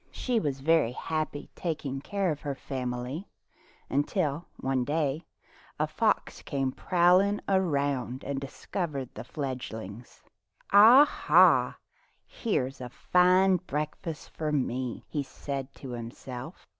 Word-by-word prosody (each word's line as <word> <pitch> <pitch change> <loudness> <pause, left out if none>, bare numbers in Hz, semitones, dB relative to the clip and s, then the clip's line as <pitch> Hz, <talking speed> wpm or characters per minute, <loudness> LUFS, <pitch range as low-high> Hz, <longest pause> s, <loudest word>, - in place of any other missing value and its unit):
She 245 -3 -1
was 140 -8 -2
very 155 -5 +3
happy 155 0 -3
taking 145 -5 -3
care 195 +1 -1
of 150 - -5
her 140 -1 -3
fam 130 -3 -4
ily 125 +10 -5 0.6
until 145 +1 -1
one 130 -1 0
day 150 +1 -1 0.5
a - - +3
fox - - 0
came 135 -2 -1
prowling 185 +6 +3
around 140 -9 0
and 140 -1 -3
discovered 140 -1 -4
the - - -7
fledglings. 120 -6 -6 0.5
'"Aha! 235 +8 +6 0.5
here's 135 - -2
a 125 - -5 0.2
flne 185 +1 +5
breakfast 155 +2 -4
for 155 -1 -3
me," 130 -3 -2
he 150 - -2
said 140 0 -5
to 135 - -9
himself. 125 +5 -8
145 Hz, 120 wpm, -28 LUFS, 130-175 Hz, 0.6 s, Aha